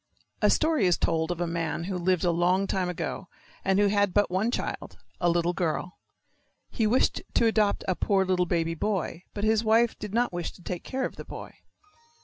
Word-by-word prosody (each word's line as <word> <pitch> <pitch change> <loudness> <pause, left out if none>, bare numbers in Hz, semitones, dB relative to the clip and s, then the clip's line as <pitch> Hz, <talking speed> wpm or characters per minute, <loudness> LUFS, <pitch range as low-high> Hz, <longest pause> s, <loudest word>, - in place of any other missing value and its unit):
A - - +5
story 310 - +3
is 175 - +3
told 160 0 0
of 175 -1 -3
a 175 - 0
man 165 -1 -2
who 190 +2 -3
lived 180 0 +1
a 175 - +3
long 180 +3 +2
time 185 -2 -1
ago, 180 +2 -4 0.4
and 195 0 +2
who 205 - +4
had 205 -2 +2
but 205 -3 +3
one 195 +5 +1
child, - - -4 0.2
a 175 - +2
little 170 +1 +1
girl. 175 0 -2 0.7
He 220 - +1
wished 245 +5 +2
to 235 - +4
adopt 215 -2 +2
a 185 - +2
poor 195 0 +1
little 180 -1 +1
baby 165 -1 0
boy, 180 -1 -2
but 205 - -3
his 220 +1 +3
wife 225 +1 +3
did 210 - -6
not 235 -1 +1
wish 175 -1 -4
to 180 - -17
take 175 0 -5
care 265 0 -2
of - - -6
the - - -6
boy. - - -9
185 Hz, 210 wpm, -27 LUFS, 175-210 Hz, 0.7 s, A